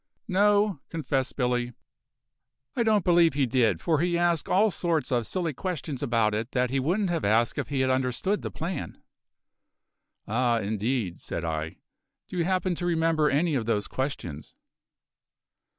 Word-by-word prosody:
"No," 205 -2 +3
confessed 135 -5 -2
Billy, 125 -2 0 1.0
"I - - +1
don't 215 -5 +2
believe 170 -3 +4
he 140 -2 +2
did, 115 -8 +2
for 155 - +1
he 175 +1 +1
asked 170 -2 +1
all 210 +3 +4
sorts 165 -7 -1
of 120 -3 +1
silly 175 -5 -2
questions 160 -4 -4
about 115 -5 +1
it 110 +3 -3
that 125 -1 +1
he 135 - +1
wouldn't 180 +7 0
have 165 -2 -1
asked 110 +3 +2
if - - -2
he 140 -2 -1
had 130 0 +2
understood 130 - 0
the - - -4
plan." 175 +3 -5 1.3
"Ah, 120 +2 +2
indeed!" 110 -2 -2
said 85 - -4
I. 80 0 -3 0.5
"Do - - -8
you 170 - +1
happen 185 0 +1
to 175 +1 -4
remember 165 -2 +2
any 155 +4 +1
of 120 -5 -1
those 105 -3 0
questions?" 110 - -5
140 Hz, 160 wpm, -27 LUFS, 120-175 Hz, 1.3 s, believe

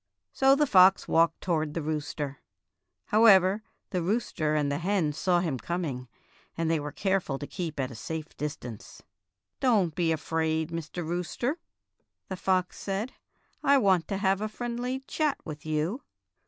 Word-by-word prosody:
So 270 0 +5
the 295 +1 +3
fox 190 -5 +6
walked 165 0 +3
toward 155 -4 -1
the 165 - -1
rooster. 145 -2 -3 0.7
However, 205 -2 +6 0.3
the 180 - 0
rooster 170 -5 0
and 145 -2 +1
the 145 - -1
hen 175 -4 +1
saw 175 +3 +2
him 155 -8 -2
coming, 140 -3 -3 0.5
and 165 0 0
they 165 - +2
were 145 0 -5
careful 190 -6 0
to 145 - -6
keep 160 -1 -5
at 130 -1 -1
a - - -9
safe 160 +7 -6
distance. 140 -7 -7 0.6
"Don't 210 - +3
be 170 -1 +1
afraid, 160 0 -1
Mr. 165 +1 -5
Rooster," 180 - -2 0.7
the 190 - -3
fox 185 -1 0
said; 200 +5 -3 0.5
"I 280 0 +5
want 190 -8 +3
to 195 - -2
have 195 0 +1
a 215 - -2
friendly 245 +3 -3
chat 300 +2 -1
with 155 0 -8
you." 155 - -1
175 Hz, 155 wpm, -28 LUFS, 155-200 Hz, 0.7 s, fox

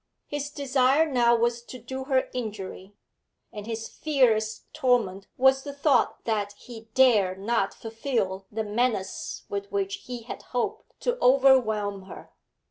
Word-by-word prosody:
His 290 0 -4
desire 280 +1 +2
now 240 -5 +3
was 235 0 +1
to 255 - -9
do 260 +3 -6
her 265 -2 +1
injury, 205 -4 -6 0.6
and 210 0 -7
his 225 -1 -4
fiercest 225 -8 0
torment 240 -10 +1
was 265 +1 +4
the 285 0 -7
thought 280 -2 +2
that 205 -3 -1
he 225 +1 -12
dared 215 -8 +4
not 200 0 0
fulfil 225 -5 -3
the 220 +1 -2
menace 210 -2 -2
with 200 0 -5
which 195 0 -1
he 245 -2 -6
had 230 - -7
hoped 245 -1 -4
to - - -1
overwhelm 240 -7 +4
her. - - -11
235 Hz, 140 wpm, -26 LUFS, 205-265 Hz, 0.6 s, was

